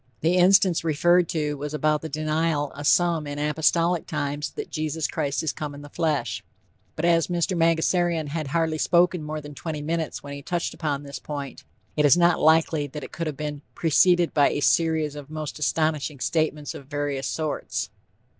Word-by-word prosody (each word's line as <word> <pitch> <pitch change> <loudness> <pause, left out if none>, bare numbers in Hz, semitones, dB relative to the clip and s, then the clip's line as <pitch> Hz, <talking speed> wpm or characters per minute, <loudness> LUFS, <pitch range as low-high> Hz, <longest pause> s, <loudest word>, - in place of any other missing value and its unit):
The 165 +3 +2
instance 185 -1 +5
referred 175 +2 +3
to 150 -2 -1
was 150 +2 -4
about 150 0 +1
the 160 - -6
denial 155 0 -1
of 145 +1 -4
some 170 -4 +3
in 145 0 -5
apostolic 160 +3 +1
times 145 +1 -2
that 435 -2 -6
"Jesus 155 0 -2
Christ 145 -3 -2
is 155 - -1
come 150 -2 -5
in 145 - -10
the 145 - -12
flesh." 160 -4 -1 0.5
But 155 - -2
as 170 -1 +3
Mr. 175 +1 0
Mangasarian 165 -1 +1
had 155 0 -3
hardly 160 +1 0
spoken 175 +1 +3
more 155 0 -5
than 150 0 -10
twenty 150 0 -5
minutes 160 +1 -3
when 140 0 -7
he 140 - -7
touched 175 +4 -2
upon 145 -3 -3
this 140 -1 -7
point, 140 -2 -7 0.3
it 150 - +2
is 145 +3 +6
not 175 0 +4
likely 160 -1 +3
that 150 +2 -8
it - - -8
could 165 -1 -4
have 150 -3 -4
been 150 -1 -4
"preceded 175 +2 +3
by 145 -2 +4
a - - -2
series 155 +2 +2
of 145 -1 -9
most 155 -1 -5
astonishing 150 -2 0
statements 150 +4 -1
of 135 - -10
various 145 -2 -2
sorts." 155 -2 -3
155 Hz, 190 wpm, -25 LUFS, 145-165 Hz, 0.5 s, is